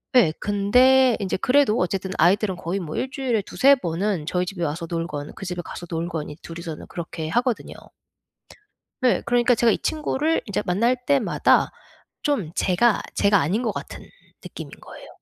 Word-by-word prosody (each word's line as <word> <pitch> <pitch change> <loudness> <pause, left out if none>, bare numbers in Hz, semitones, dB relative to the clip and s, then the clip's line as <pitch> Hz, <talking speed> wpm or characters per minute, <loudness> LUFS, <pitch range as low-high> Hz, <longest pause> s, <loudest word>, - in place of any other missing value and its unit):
예. 230 -11 +6
근데 250 +5 +4
인제 195 -2 -2
그래도 260 -4 +3
어쨌든 190 +1 -1
아이들은 195 +2 +3
거의 180 +4 -3
뭐 160 -5 -6
1 260 - -2
주일에 260 -6 -1
2-3 275 +7 +4
번은 180 - -2
저희 180 +1 0
집에 180 -1 -5
와서 165 +2 -2
놀건 165 -4 -4
그 - - -8
집에 180 -1 -4
가서 175 - -8
놀건 165 -2 -3
이제 150 +1 -10
2 165 0 -8
이서는 165 -2 -7
그렇게 165 -2 -6
하거든요. 240 +2 -1 1.3
네. 255 -2 +3
그러니까 240 0 +3
제가 235 0 +3
이 - - +1
친구를 310 +1 0
이제 205 - -1
만날 230 +8 +2
때마다 280 -4 +3 0.5
좀 265 - -1
제가, 200 +5 +2
제가 200 0 +4
아닌 180 +10 0
것 225 - 0
같은 - - -7 0.4
느낌인 - - -9
거예요. - - -12
200 Hz, 330 characters per minute, -23 LUFS, 170-245 Hz, 1.3 s, 예